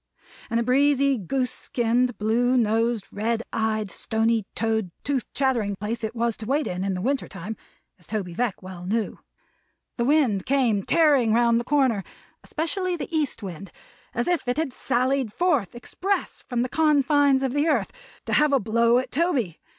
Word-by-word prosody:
And 230 Hz, -, +1 dB
a -, -, +1 dB
breezy, 275 Hz, +2 st, +3 dB
goose 250 Hz, +6 st, -1 dB
skinned, 245 Hz, 0 st, 0 dB
blue 240 Hz, +4 st, +2 dB
nosed, 225 Hz, -1 st, +1 dB
red 225 Hz, +3 st, -1 dB
eyed, 215 Hz, -2 st, -1 dB
stony 225 Hz, +1 st, 0 dB
toed, 220 Hz, -3 st, 0 dB
tooth 275 Hz, -4 st, -2 dB
chattering 240 Hz, -7 st, +1 dB
place 215 Hz, +4 st, -4 dB
it 220 Hz, +2 st, -3 dB
was 230 Hz, -1 st, 0 dB
to 220 Hz, -, -7 dB
wait 290 Hz, +4 st, +1 dB
in, 180 Hz, +1 st, -3 dB
in 195 Hz, -1 st, -1 dB
the 180 Hz, -, -4 dB
winter 270 Hz, +2 st, 0 dB
time, 195 Hz, +4 st, -7 dB, 0.4 s
as 175 Hz, -, -14 dB
Toby 200 Hz, -5 st, -3 dB
Veck 230 Hz, -1 st, -2 dB
well 180 Hz, -1 st, -8 dB
knew. 220 Hz, +2 st, -1 dB, 0.8 s
The 235 Hz, -, 0 dB
wind 255 Hz, -9 st, +2 dB
came 250 Hz, -7 st, +2 dB
tearing 280 Hz, -, +3 dB
round 235 Hz, 0 st, +4 dB
the -, -, -3 dB
corner 255 Hz, -6 st, +2 dB, 0.4 s
especially 360 Hz, +3 st, -2 dB
the 335 Hz, 0 st, -5 dB
east 295 Hz, -7 st, -1 dB
wind 185 Hz, 0 st, -7 dB, 0.4 s
as 240 Hz, -, -1 dB
if 350 Hz, -7 st, 0 dB
it 245 Hz, -, 0 dB
had 310 Hz, -5 st, -1 dB
sallied 255 Hz, -1 st, 0 dB
forth, 285 Hz, -, 0 dB
express, 385 Hz, +11 st, -3 dB
from 245 Hz, -1 st, 0 dB
the 250 Hz, -, -3 dB
confines 290 Hz, -2 st, +3 dB
of 260 Hz, -2 st, -1 dB
the 290 Hz, +2 st, +1 dB
earth, -, -, +1 dB, 0.3 s
to -, -, -3 dB
have 300 Hz, -1 st, +4 dB
a 275 Hz, -, +4 dB
blow 230 Hz, +2 st, +3 dB
at 255 Hz, -, -2 dB
Toby. 270 Hz, -, 0 dB
240 Hz, 175 wpm, -24 LUFS, 220-275 Hz, 0.8 s, round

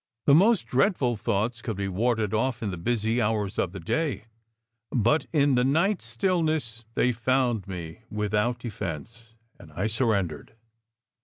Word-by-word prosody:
The 140 Hz, -, +6 dB
most 195 Hz, -, +5 dB
dreadful 130 Hz, -, +2 dB
thoughts 110 Hz, +3 st, -1 dB
could 110 Hz, -5 st, -4 dB
be 100 Hz, -1 st, -2 dB
warded 110 Hz, +2 st, 0 dB
off 120 Hz, +1 st, 0 dB
in 105 Hz, -, -1 dB
the 90 Hz, -, -5 dB
busy 115 Hz, +4 st, 0 dB
hours 105 Hz, -2 st, -1 dB
of 85 Hz, -, 0 dB
the 95 Hz, -, -7 dB
day; 145 Hz, -, -2 dB, 0.6 s
but 120 Hz, +5 st, +2 dB
in 145 Hz, -3 st, +3 dB
the 125 Hz, -1 st, +3 dB
night 170 Hz, +9 st, +2 dB
stillness 155 Hz, -, -1 dB
they 125 Hz, -, +3 dB
found 120 Hz, -3 st, 0 dB
me 85 Hz, -3 st, -7 dB
without 105 Hz, +3 st, 0 dB
defence, 115 Hz, -, -7 dB, 0.2 s
and 80 Hz, -, -14 dB
I 95 Hz, -, -2 dB
surren 110 Hz, -4 st, +2 dB
dered. 75 Hz, -, -10 dB
115 Hz, 155 wpm, -26 LUFS, 105-130 Hz, 0.6 s, The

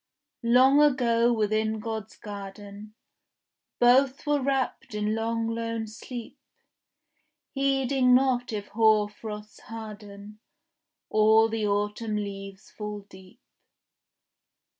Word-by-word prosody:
Long 265 Hz, +4 st, +6 dB
ago 240 Hz, -5 st, +3 dB
within 220 Hz, 0 st, 0 dB
God's 220 Hz, 0 st, -6 dB
garden 205 Hz, +1 st, -9 dB, 0.8 s
Both 260 Hz, +3 st, +4 dB
were 295 Hz, -1 st, +1 dB
wrapped 265 Hz, -2 st, -2 dB
in 210 Hz, 0 st, -1 dB
long 225 Hz, +1 st, -1 dB
lone 230 Hz, 0 st, -3 dB
sleep, 230 Hz, +2 st, -9 dB, 1.1 s
Heeding 270 Hz, -2 st, +2 dB
not 250 Hz, -2 st, +1 dB
if 205 Hz, -2 st, -5 dB
hoar 215 Hz, -1 st, +3 dB
frosts 210 Hz, 0 st, -9 dB
harden, 210 Hz, -2 st, -10 dB, 0.7 s
Or 220 Hz, +1 st, +5 dB
the 220 Hz, -1 st, -1 dB
autumn 210 Hz, +2 st, -1 dB
leaves 195 Hz, -1 st, -6 dB
fall 210 Hz, -1 st, -6 dB
deep. 190 Hz, +2 st, -17 dB
220 Hz, 95 wpm, -27 LUFS, 210-245 Hz, 1.1 s, Long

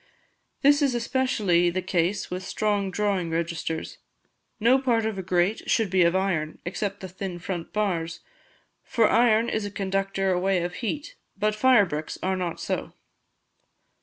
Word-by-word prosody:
This 285 Hz, +2 st, +5 dB
is 275 Hz, -4 st, +2 dB
especially 230 Hz, -8 st, +2 dB
the 185 Hz, +1 st, -2 dB
case 185 Hz, +2 st, 0 dB
with 180 Hz, +1 st, -3 dB
strong 205 Hz, 0 st, -1 dB
drawing 195 Hz, -3 st, 0 dB
registers. 165 Hz, -1 st, -3 dB, 0.6 s
No 240 Hz, +5 st, +4 dB
part 235 Hz, -4 st, +1 dB
of 220 Hz, -3 st, -2 dB
a -, -, -1 dB
grate 180 Hz, +3 st, 0 dB
should 220 Hz, -5 st, +2 dB
be 190 Hz, -1 st, +3 dB
of 170 Hz, +1 st, +4 dB
iron, 175 Hz, -5 st, 0 dB
except 200 Hz, +3 st, -3 dB
the 190 Hz, -, -5 dB
thin 185 Hz, 0 st, -6 dB
front 175 Hz, -1 st, -5 dB
bars; 170 Hz, -6 st, -1 dB, 0.6 s
for 225 Hz, -2 st, +2 dB
iron 230 Hz, -1 st, +4 dB
is 220 Hz, -, -1 dB
a 205 Hz, -, -3 dB
conductor 195 Hz, -1 st, -1 dB
away 185 Hz, 0 st, +1 dB
of 175 Hz, 0 st, -3 dB
heat, 290 Hz, -, -3 dB, 0.2 s
but 210 Hz, +1 st, +1 dB
fire 235 Hz, -1 st, +5 dB
bricks 155 Hz, -2 st, -5 dB
are 190 Hz, +1 st, +1 dB
not 180 Hz, -3 st, -3 dB
so." -, -, -3 dB
195 Hz, 160 wpm, -26 LUFS, 175-215 Hz, 0.6 s, This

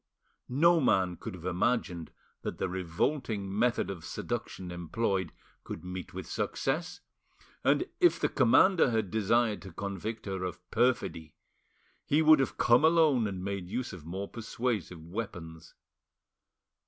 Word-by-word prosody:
No 165 Hz, +7 st, +5 dB
man 95 Hz, -8 st, +2 dB
could 90 Hz, -, -7 dB
have 85 Hz, -1 st, -11 dB
imagined 90 Hz, -2 st, 0 dB, 0.3 s
that -, -, -4 dB
the -, -, -1 dB
revolting 95 Hz, -, -2 dB
method 115 Hz, -2 st, +1 dB
of 85 Hz, -4 st, -8 dB
seduction 90 Hz, +3 st, -5 dB
employed 95 Hz, +1 st, -1 dB, 0.3 s
could -, -, -7 dB
meet 90 Hz, -1 st, -6 dB
with -, -, -6 dB
success, 165 Hz, +6 st, -2 dB, 0.6 s
and -, -, +3 dB
if 350 Hz, -2 st, +4 dB
the -, -, +2 dB
commander 135 Hz, +7 st, +5 dB
had 110 Hz, -5 st, -1 dB
desired 110 Hz, +1 st, +2 dB
to 95 Hz, -, -10 dB
convict 100 Hz, +5 st, -5 dB
her 95 Hz, -2 st, -3 dB
of 90 Hz, -4 st, -4 dB
perfidy 115 Hz, -10 st, 0 dB, 0.7 s
he 155 Hz, +3 st, +2 dB
would 155 Hz, -1 st, +7 dB
have 135 Hz, -, -1 dB
come 120 Hz, +4 st, +5 dB
alone 155 Hz, -8 st, +4 dB
and 95 Hz, -2 st, -5 dB
made 100 Hz, -2 st, -4 dB
use 125 Hz, +1 st, -3 dB
of 85 Hz, -5 st, -9 dB
more 95 Hz, +5 st, -5 dB
persuasive 110 Hz, -7 st, -3 dB
weapons. 85 Hz, -4 st, -7 dB
100 Hz, 140 wpm, -30 LUFS, 90-125 Hz, 0.7 s, would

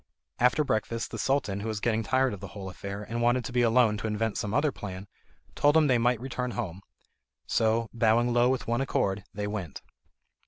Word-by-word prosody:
After 125 Hz, +5 st, +4 dB
breakfast, 115 Hz, -3 st, -2 dB
the -, -, -5 dB
Sultan, 130 Hz, -8 st, 0 dB
who 105 Hz, -, -5 dB
was 110 Hz, -1 st, -2 dB
getting 115 Hz, 0 st, +1 dB
tired 130 Hz, +2 st, +1 dB
of 100 Hz, -, -7 dB
the 100 Hz, -, -7 dB
whole 95 Hz, -1 st, -6 dB
affair 100 Hz, +3 st, -6 dB
and 115 Hz, +3 st, -4 dB
wanted 120 Hz, 0 st, +2 dB
to -, -, -5 dB
be 125 Hz, 0 st, +2 dB
alone 115 Hz, -2 st, +4 dB
to 115 Hz, -, -3 dB
invent 110 Hz, 0 st, -1 dB
some 105 Hz, -3 st, -3 dB
other 145 Hz, +5 st, +2 dB
plan, 95 Hz, -4 st, -7 dB, 0.5 s
told 145 Hz, +2 st, +3 dB
them 160 Hz, -1 st, +6 dB
they 125 Hz, -4 st, +3 dB
might 120 Hz, 0 st, +2 dB
return 125 Hz, 0 st, -3 dB
home. 95 Hz, -6 st, -4 dB, 0.6 s
So, 115 Hz, +1 st, +1 dB
bowing 120 Hz, +1 st, +3 dB
low 120 Hz, +1 st, +4 dB
with 130 Hz, -1 st, -1 dB
one 120 Hz, +2 st, 0 dB
accord, 100 Hz, -7 st, 0 dB
they 105 Hz, 0 st, -4 dB
went. 105 Hz, -7 st, -5 dB
115 Hz, 205 wpm, -28 LUFS, 105-125 Hz, 0.6 s, them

